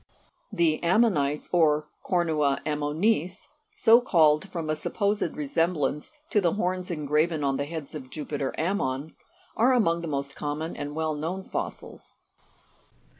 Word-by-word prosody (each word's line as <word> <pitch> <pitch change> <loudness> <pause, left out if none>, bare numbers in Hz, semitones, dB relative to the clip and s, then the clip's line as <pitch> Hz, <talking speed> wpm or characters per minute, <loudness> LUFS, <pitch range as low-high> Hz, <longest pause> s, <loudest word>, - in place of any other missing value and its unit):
51 - - -10
The 165 -2 +2
Ammonites, 170 -7 +2
(Jig. - - -17
62), 180 - +2
or 150 -2 +3 0.2
Co'rnua 155 -6 +1
Ammonis 160 +6 0 0.2
so 230 +1 +5
called 160 -5 +3
from 165 -3 -4
a - - +1
sup 155 - -6
posed 205 -4 0
resemblance 150 -1 -1 0.2
to 210 - +3
the 175 -3 +2
horns 185 -2 -2
engraven 155 0 0
on 135 -1 +1
the 140 - -1
heads 155 -1 -7
of 135 -4 -8
Jupiter 145 -2 -3
Ammon 155 -5 -2 0.4
are 250 +4 +4
among 170 -9 +2
the 170 - -5
most 140 -2 -3
common 150 +3 -4
and 145 +1 -5
well 160 -1 -1
known 165 +6 -4
fossils. - - -6
160 Hz, 155 wpm, -26 LUFS, 150-180 Hz, 0.4 s, so